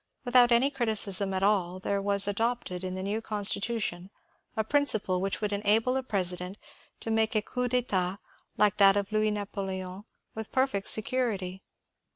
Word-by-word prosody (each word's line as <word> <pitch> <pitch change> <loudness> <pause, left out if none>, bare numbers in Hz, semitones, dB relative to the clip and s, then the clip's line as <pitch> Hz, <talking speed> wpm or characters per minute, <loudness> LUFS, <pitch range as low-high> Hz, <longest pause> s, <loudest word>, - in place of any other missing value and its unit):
Without 245 0 +5
any 250 +4 +3
criticism 210 -6 +3
at 190 0 -2
all 190 -3 +1
there 200 +1 -2
was 200 0 +4
adopted 205 -3 -2
in 185 0 -4
the 185 - -5
new 210 +3 -3
Constitution 205 -3 0 0.5
a 220 - +1
principle 220 -8 +1
which 195 +2 -3
would 210 -1 -2
enable 215 +5 +1
a 265 - 0
president 185 -4 -3 0.4
to 225 - -4
make 220 0 0
a 215 - +3
coup 250 +2 -3
d'etat 200 -7 -1 0.4
like 210 0 +2
that 195 0 +6
of 200 +1 -3
Louis 215 0 +1
Napoleon 195 -2 -5 0.3
with 220 -1 -7
perfect 260 -7 0
security. 215 -5 -1
205 Hz, 160 wpm, -28 LUFS, 190-225 Hz, 0.5 s, that